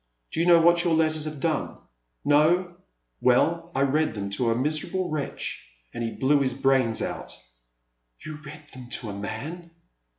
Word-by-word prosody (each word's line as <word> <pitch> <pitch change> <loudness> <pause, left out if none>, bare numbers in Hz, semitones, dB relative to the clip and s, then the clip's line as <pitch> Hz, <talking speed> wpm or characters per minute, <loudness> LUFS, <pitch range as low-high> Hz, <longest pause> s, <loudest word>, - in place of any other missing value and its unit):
Do - - -2
you 170 - +2
know 170 -1 +7
what 170 +1 +4
your 170 -2 +2
letters 155 -1 +2
have 155 -2 -5
done? 155 0 -1 0.5
No? 170 +5 +3 0.5
Well 170 +7 +2
I 135 - +1
read 140 -2 +1
them 100 -1 -4
to 115 +4 0
a 115 - +2
miserable 155 +7 -1
wretch 150 -3 -4 0.3
and 120 - -4
he 115 - -1
blew 140 +5 +2
his 130 -2 0
brains 130 -4 +2
out! - - -5 0.4
" - - -24
You 155 -1 -6
read 150 0 -11
them 125 -2 -10
to 115 - -4
a - - -5
man 135 - -6
145 Hz, 175 wpm, -26 LUFS, 120-160 Hz, 0.5 s, know